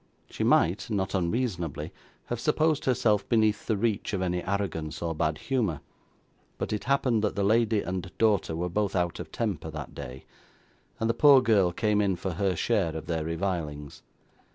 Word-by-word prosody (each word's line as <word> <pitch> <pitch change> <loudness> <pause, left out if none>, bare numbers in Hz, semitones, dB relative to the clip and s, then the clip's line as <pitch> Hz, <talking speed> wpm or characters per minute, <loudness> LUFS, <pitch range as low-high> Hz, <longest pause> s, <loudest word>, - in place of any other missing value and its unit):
She - - -3
might, 90 +8 +2
not 100 -3 -1
unreasonably, 90 - -2 0.3
have 120 - -4
supposed 155 +3 +1
herself 120 -5 +2
beneath 110 -3 +2
the 110 - +1
reach 105 0 -1
of 95 - -1
any 90 -1 -1
arrogance, 95 -6 -3
or 85 -1 -2
bad 80 -1 0
humour; 105 - -1 0.8
but - - -3
it 105 - -3
happened 125 -4 +2
that 105 - 0
the 100 - 0
lady 110 +1 +3
and 90 0 -4
daughter 105 -7 +2
were 85 +2 -2
both 100 +2 -1
out 85 -2 0
of 80 -3 -7
temper 100 -9 -3
that 75 -4 -7
day, 65 +1 -8 0.7
and 115 - 0
the 115 - +2
poor 140 +2 +7
girl 105 -8 +3
came 105 +3 +1
in 95 -2 +1
for 95 +2 -4
her 95 +2 0
share 80 0 0
of 80 - -5
their 80 -1 -2
revilings. 80 -4 -3
100 Hz, 175 wpm, -28 LUFS, 85-110 Hz, 0.8 s, poor